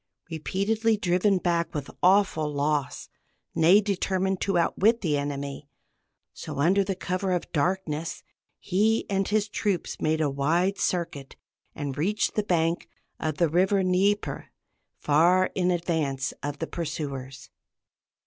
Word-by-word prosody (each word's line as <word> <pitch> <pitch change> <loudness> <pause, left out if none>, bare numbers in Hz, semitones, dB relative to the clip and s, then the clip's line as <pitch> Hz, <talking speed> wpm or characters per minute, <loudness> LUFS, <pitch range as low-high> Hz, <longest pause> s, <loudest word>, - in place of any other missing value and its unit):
Repeatedly 215 +7 0
driven 185 +1 +2
back 170 -2 -1
with 145 -2 -4
awful 180 -5 +3
loss, 145 0 -1 0.5
Ney 170 +5 +5
determined 190 -1 -1
to 195 -3 +1
outwit 215 +7 +2
the 160 -6 +1
enemy; 140 0 -4 0.6
so, - - -7
under 185 +8 +3
cover 185 +1 -2
of 175 - -3
darkness, 165 0 -2 0.3
he 215 +4 +1
and 195 -1 +1
his 210 0 +1
troops 205 -3 -2
made 155 0 +1
a 155 - +2
wide 165 +8 0
circuit, 165 -6 -2 0.4
and 140 -2 -4
reached 205 +7 0
the 210 - +1
bank 170 -4 0 0.3
of 155 -2 -2
the 170 - +3
river 190 +5 +2
Dnieper 195 +3 0 0.5
far 175 +5 +3
in 180 -1 +1
advance 160 -6 -1
of 145 0 -4
the 160 - -3
pursuers. 140 -6 -6
175 Hz, 130 wpm, -26 LUFS, 150-195 Hz, 0.6 s, Ney